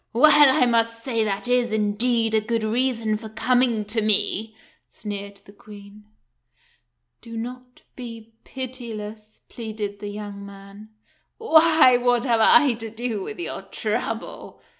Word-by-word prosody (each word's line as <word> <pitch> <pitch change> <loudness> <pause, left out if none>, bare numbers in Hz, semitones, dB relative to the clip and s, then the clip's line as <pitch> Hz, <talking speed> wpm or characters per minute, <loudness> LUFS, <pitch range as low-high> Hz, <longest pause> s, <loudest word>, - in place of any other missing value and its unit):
"Well, 285 +1 +6
I - - +5
must 230 -1 0
say 230 -4 -1
that 205 +2 -3
is, 245 -2 +1
indeed, 220 +2 0
a 220 - +3
good 225 +1 -2
reason 230 -1 0
for 220 -1 -9
com 250 +3 +1
ing 230 -4 0
to 220 +2 -1
me," 215 +1 +1 0.3
sneered 200 -1 -7
the 200 - -16
Queen. 205 0 -14 1.2
"Do 230 -1 -9
not 250 +2 -8
be 230 -3 -10
pitiless," 220 -5 -8
pleaded 215 -3 -6
the 205 - -7
young 205 -1 -8
man. 200 +1 -13 0.2
" - - -41
Why, 315 - +5
what 245 0 +1
have 230 -3 +2
I 285 +3 +6
to 225 -1 -7
do 225 -1 -4
with - - -7
your 350 - -5
trouble - - -5
225 Hz, 145 wpm, -23 LUFS, 210-245 Hz, 1.2 s, Well